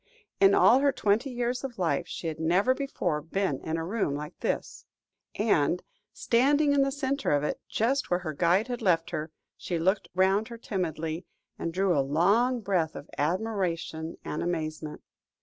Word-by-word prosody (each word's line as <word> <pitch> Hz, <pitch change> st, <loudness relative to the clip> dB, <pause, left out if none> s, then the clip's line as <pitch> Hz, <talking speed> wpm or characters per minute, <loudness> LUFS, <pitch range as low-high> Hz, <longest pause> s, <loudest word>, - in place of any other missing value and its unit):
In 195 Hz, 0 st, +6 dB
all 250 Hz, -, +6 dB
her 280 Hz, 0 st, +3 dB
twenty 225 Hz, +3 st, +1 dB
years 245 Hz, 0 st, -2 dB
of 265 Hz, -3 st, -5 dB
life 175 Hz, -4 st, 0 dB
she -, -, -7 dB
had 160 Hz, -1 st, -3 dB
never 180 Hz, +10 st, +3 dB
before 185 Hz, -, -2 dB
been 165 Hz, -2 st, -1 dB
in 160 Hz, +1 st, -3 dB
a 165 Hz, -, -3 dB
room 190 Hz, -7 st, -1 dB
like 150 Hz, +1 st, -6 dB
this -, -, -3 dB, 0.5 s
room, 210 Hz, -, 0 dB
and, 170 Hz, -2 st, +2 dB, 0.3 s
standing 285 Hz, +5 st, +3 dB
in 280 Hz, -, +4 dB
the 275 Hz, 0 st, +2 dB
centre 275 Hz, 0 st, -1 dB
of 145 Hz, 0 st, +2 dB
it, 150 Hz, -, -2 dB
just 265 Hz, +5 st, 0 dB
where 180 Hz, 0 st, +1 dB
her 155 Hz, -3 st, -4 dB
guide 180 Hz, -, +2 dB
had 245 Hz, -1 st, -4 dB
left 170 Hz, -5 st, +2 dB
her, 155 Hz, +1 st, -3 dB, 0.3 s
she 175 Hz, -, -3 dB
looked 190 Hz, +5 st, +1 dB
round 190 Hz, +3 st, +3 dB
her 235 Hz, -, -8 dB
timidly, 165 Hz, -6 st, -3 dB, 0.3 s
and 165 Hz, -, -2 dB
drew 185 Hz, 0 st, +1 dB
a 140 Hz, -, +3 dB
long 200 Hz, -, +2 dB
breath 180 Hz, -6 st, 0 dB
of 145 Hz, -, -9 dB
admiration 170 Hz, -2 st, -2 dB
and -, -, -3 dB
amazement. 155 Hz, -3 st, -3 dB
185 Hz, 180 wpm, -28 LUFS, 160-235 Hz, 0.5 s, In